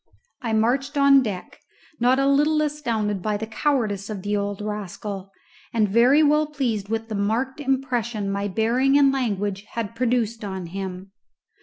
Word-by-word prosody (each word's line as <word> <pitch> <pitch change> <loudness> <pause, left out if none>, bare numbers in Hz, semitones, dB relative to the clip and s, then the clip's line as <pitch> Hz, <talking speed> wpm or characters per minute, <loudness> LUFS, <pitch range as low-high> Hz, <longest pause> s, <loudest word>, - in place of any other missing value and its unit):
I 235 -3 -2
marched 265 +7 +1
on 280 -1 +6
deck, 205 -7 -5 0.4
not 250 +2 +4
a 275 - +2
little 295 +3 +3
astounded 230 -10 -1
by 210 +2 -1
the 220 - -4
cowardice 220 -5 -1
of 200 -4 -5
the 205 0 -1
old 200 -1 -2
rascal, 205 -1 -5 0.4
and 220 -2 +3
very 245 +9 +5
well 300 +1 +3
pleased 240 -9 -2
with 225 0 -2
the 220 - -6
marked 225 +7 -1
impression 245 -7 -1
my 200 +1 -1
bearing 240 +7 +2
and 275 -1 +5
language 205 -6 -1
had 230 -1 -4
produced 230 -2 0
on 190 -3 -4
him. 190 +1 -6
225 Hz, 160 wpm, -23 LUFS, 205-270 Hz, 0.4 s, on